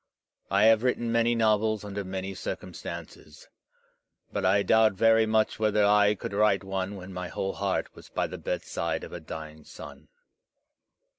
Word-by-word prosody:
I 100 +1 +3
have 110 0 +6
written 120 -2 0
many 115 0 +2
novels 110 -1 +2
imder 100 0 -5
many 95 +1 -5
circumstances; 75 -4 -8 0.8
but 100 - -2
I 100 +2 +3
doubt 110 -1 +4
very 110 +2 +4
much 110 0 +1
whether 105 -1 +3
I 105 0 +4
could 100 - -6
write 100 -2 +2
one 95 +1 -3
when 95 0 -9
my 90 0 -4
whole 95 +2 -3
heart 100 -1 -2
was - - -15
by - - -1
the - - -7
bedside - - -3
of - - -9
a 90 - -5
dying 80 -1 -9
son. - - -12
100 Hz, 160 wpm, -27 LUFS, 95-110 Hz, 0.8 s, have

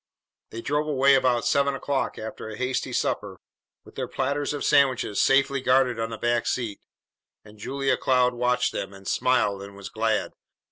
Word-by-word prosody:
They 115 - -7
drove 150 +2 0
away 140 -1 +4
about 125 -3 +2
seven 140 -1 +2
o'clock 140 0 -2
after 110 0 -7
a 110 - -8
hasty 130 +1 -2
supper, - - -2 0.5
with - - -15
their - - -4
platters 140 +1 -2
of 145 - -4
sandwiches 130 -6 +3
safely 140 0 +3
guarded 125 -2 +2
on 115 0 -2
the 115 - -6
back 120 +1 0
seat; 115 -5 -2 0.7
and 105 0 -16
Julia 135 +4 -1
Cloud 125 -1 +2
watched 125 +1 +1
them, 100 - -5
and 95 0 -13
smiled 100 -6 +1
and 100 0 -10
was 100 -1 -8
glad. 110 +1 -1
125 Hz, 175 wpm, -25 LUFS, 110-135 Hz, 0.7 s, away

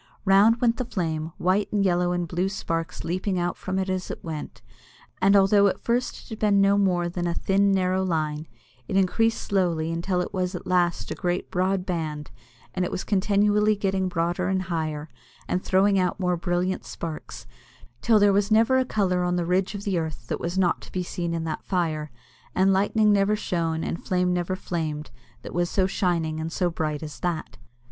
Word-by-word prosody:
Round 205 +4 +5
went 235 -2 +2
the 255 - -2
flame, 160 -7 -3
white 190 +3 +1
and 205 -2 +1
yellow 175 -1 +2
and 175 -1 -1
blue 180 +3 -1
sparks 165 -3 -3
leaping 185 +3 -1
out 175 0 -1
from 190 0 -4
it 190 0 0
as 185 -1 -2
it - - -7
went, 150 -8 -7 0.6
and 200 +2 +5
although 200 +1 +5
at 195 - -1
first 240 +1 0
it - - -17
had 220 -2 -7
been 205 -2 +3
no 195 0 +4
more 180 -3 +2
than 175 0 -3
a 170 - -1
thin, 200 +1 +2
narrow 185 -1 +1
line, 155 -3 -2 0.4
it 190 - 0
increased 225 +4 +2
slowly 170 -5 0
until 175 +2 -1
it 180 - -3
was 185 -1 -1
at - - -6
last 175 -1 +1
a - - 0
great 175 -1 -2
broad 185 0 0
band, 155 -5 -3 0.4
and 185 - -1
it 180 - -1
was - - -3
continually 210 +1 +2
getting 195 -2 0
broader 175 +1 -1
and 190 0 0
higher, 155 -4 -3 0.4
and 180 - -1
throwing 195 +1 +3
out 180 0 0
more 180 -1 +1
brilliant 175 +2 -1
sparks, 160 -2 -7 0.6
till 225 -2 +4
there 205 -1 +5
was 200 +1 +2
never 225 +4 +4
a 260 - +1
colour 190 -6 0
on 180 0 0
the 175 -1 0
ridge 185 +4 0
of 200 - -6
the 195 -4 0
earth 155 -7 -5
that - - -2
was 175 +2 -3
not 180 -2 +2
to - - -12
be 185 - -2
seen 175 -1 -3
in 165 -1 -2
that 160 -1 -4
fire; 160 -5 -1 0.5
and 190 +1 +4
lightning 210 +2 +3
never 200 +1 +3
shone 165 -5 -1
and 170 - -4
flame 180 -1 +1
never 175 +1 -1
flamed 155 -6 -4 0.3
that - - -8
was 175 0 0
so 190 - +2
shining 170 -5 0
and 160 +1 -4
so 175 +1 0
bright 155 -2 -3
as 150 -1 -8
that. 170 -3 -3
180 Hz, 205 wpm, -25 LUFS, 170-195 Hz, 0.6 s, Round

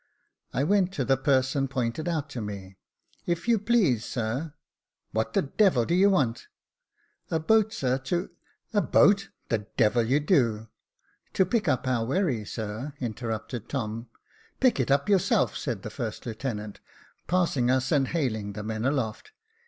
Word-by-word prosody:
I 130 - 0
went 195 +3 +3
up - - -18
to 135 -8 -1
the 135 - +4
person 135 0 +1
pointed 130 +4 -2
out 155 -4 -1
to 125 - -4
me; 100 -2 -7 0.2
" - - -48 0.2
if 170 +3 -1
you 230 -2 +4
please, 195 - +2
sir 125 +7 -3 0.2
" - - -65
" - - -54
What 110 0 -1
the 195 - +2
devil 145 - +3
do 170 - -1
you 190 +3 +5
want? 135 - +1 0.3
" - - -48
" - - -37 0.2
A 160 - +1
boat, 220 +6 +3
sir, 130 - 0
to 175 +7 -2
" - - -37
" - - -40
A 205 - +3
boat! 200 0 +4 0.2
the 105 -3 -1
devil 115 0 +4
you 125 +6 +2
do! 115 - +1 0.2
" - - -44
" - - -41
To 190 - +4
pick 210 0 0
up 130 -3 +1
our 125 -3 +1
wherry, 130 - 0
sir," 110 +7 -5
interrupted 115 -1 -4
Tom. 115 -3 -4 0.2
" - - -32
Pick 255 - +3
it 130 - 0
up 140 +1 +2
yourself," 195 -4 +2
said - - -4
the - - -6
first - - -5
lieutenant, 110 -3 -5 0.5
passing 165 -9 +1
us, 130 +1 +1
and 140 -3 +3
hailing 110 -11 -2
the 105 +1 -6
men 110 +2 -3
aloft. 130 - -2
130 Hz, 190 wpm, -27 LUFS, 115-170 Hz, 0.5 s, you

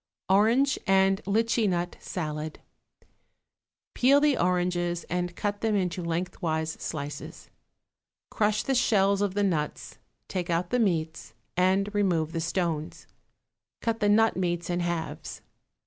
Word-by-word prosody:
=Orange 235 +8 +4
and 195 0 +3
Litchi 225 +1 +2
Nut 175 -1 -2
Salad.= 155 -2 -5 1.3
Peel 275 +3 +5
the 295 -1 +3
oranges 175 -2 0
and 175 0 -2
cut 205 -1 -2
them 220 -2 +1
into 180 -2 -1
lengthwise 165 -2 -2
slices. 145 -2 -6 0.8
Crush 210 -1 +1
the 270 - 0
shells 200 -5 +3
of 200 -2 0
the 205 - +2
nuts, 160 -6 -2 0.3
take 180 -2 -3
out 175 +1 0
the 250 - +2
meats, 160 -7 -1 0.2
and 190 +3 +2
remove 175 -6 +1
the 165 -1 -2
stones; 160 -1 -2 0.7
cut 230 -1 -1
the 205 - +2
nut 225 +2 +4
meats 175 -1 -1
in 175 - 0
halves. 170 -2 -4
180 Hz, 130 wpm, -27 LUFS, 170-205 Hz, 1.3 s, Peel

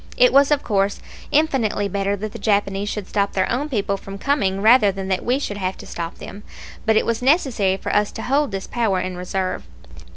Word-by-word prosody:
It - - +5
was 280 0 +6
of 295 -1 +2
course 200 -2 0 0.3
infinitely 265 -9 +1
better 200 +1 -1
that 210 +1 -5
the - - -9
Japanese 200 -1 0
should 210 -3 -4
stop 200 -1 0
their 190 -1 +1
own 285 +5 -1
people 200 -6 -1
from 195 0 -9
coming 200 -7 0
rather 215 0 +5
than 195 0 -6
that 190 - 0
we 250 +2 +1
should 210 -8 -4
have 185 -1 -3
to - - -11
stop 170 -1 -5
them; 205 - -10 0.5
but 220 - +4
it - - +2
was 230 0 -1
necessary 250 - +2
for - - -3
us 210 0 +2
to 225 - -6
hold 285 +3 +1
this 195 -1 -4
power 220 -6 0
in 185 0 -4
reserve. 185 +1 -3
205 Hz, 220 wpm, -21 LUFS, 195-250 Hz, 0.5 s, was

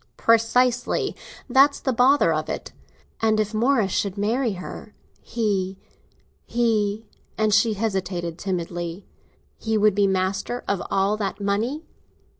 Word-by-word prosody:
"Precisely—that's 250 +4 +2
the 265 - -1
bother 260 +4 +4
of - - -2
it." - - -5 0.5
"And 220 -1 +2
if 215 0 -1
Morris 225 -3 +2
should 200 +1 -1
marry 225 +3 0
her, 190 +3 -9 0.3
he—he—" 210 +1 -3 0.3
And 215 -1 +2
she 215 +1 +4
hesitated 185 -5 -3
timidly. 175 -1 -4 0.5
"He 220 -1 0
would 210 -1 +4
be 200 0 +3
master 190 +5 -1
of 200 -3 0
all 195 +2 +1
that 205 -1 -3
money? 220 +10 -1
215 Hz, 115 wpm, -23 LUFS, 195-230 Hz, 0.5 s, bother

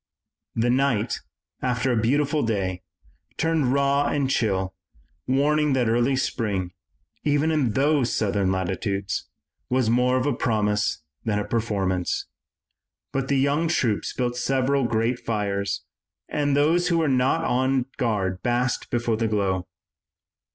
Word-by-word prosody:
The 120 +2 +2
night, 125 -5 +1 0.4
after 125 +1 0
a - - +2
beautiful 145 +5 +1
day, 95 -5 -1 0.6
turned 160 -6 +1
raw 140 +1 +2
and 140 -2 0
chill, 95 -6 0 0.5
warning 150 +2 +2
that 125 -3 +2
early 120 +4 +2
spring, 100 -8 -1 0.5
even 145 +2 +2
in 140 -8 +1
those 140 -1 +2
southern 100 -3 +1
latitudes, 95 +1 -2 0.4
was 125 -3 +2
more 125 +2 +3
of 130 - 0
a 145 - +2
promise 105 -7 0 0.2
than 110 -2 0
a 105 - -1
performance. 95 -6 -1 0.9
But 135 -1 -1
the 140 - +2
young 140 +5 +2
troops 125 -11 0
built 120 -1 -2
several 135 +1 +1
great 115 +1 0
fires 100 -3 -2 0.4
and 145 -1 0
those 165 +5 +3
who 170 -2 +2
were 160 -2 +2
not 130 -1 +2
on 130 0 +1
guard 100 -7 -1
basked 120 +1 0
before 120 -2 0
the 115 0 0
glow. 95 -4 0
125 Hz, 135 wpm, -24 LUFS, 105-140 Hz, 0.9 s, more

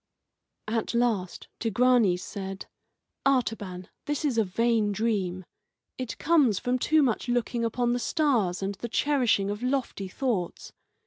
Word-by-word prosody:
At 225 +1 -1
last 225 -7 0
Tigranes 230 -5 +3
said: 195 -1 -6 0.6
"Artaban, 215 -9 0 0.2
this 295 +1 -2
is 255 -6 +1
a - - +4
vain 220 +2 +1
dream. 195 -4 -1 0.5
It 255 -2 -5
comes 285 - +3
from 250 +5 0
too 310 +3 +3
much 245 -1 0
looking 240 0 0
upon 240 +1 +1
the 245 - 0
stars 230 - +1
and 195 +1 -1
the 235 +5 -6
cherishing 240 -8 +2
of 205 +2 -5
lofty 250 -6 -1
thoughts. 200 -4 -3
230 Hz, 135 wpm, -27 LUFS, 195-250 Hz, 0.6 s, a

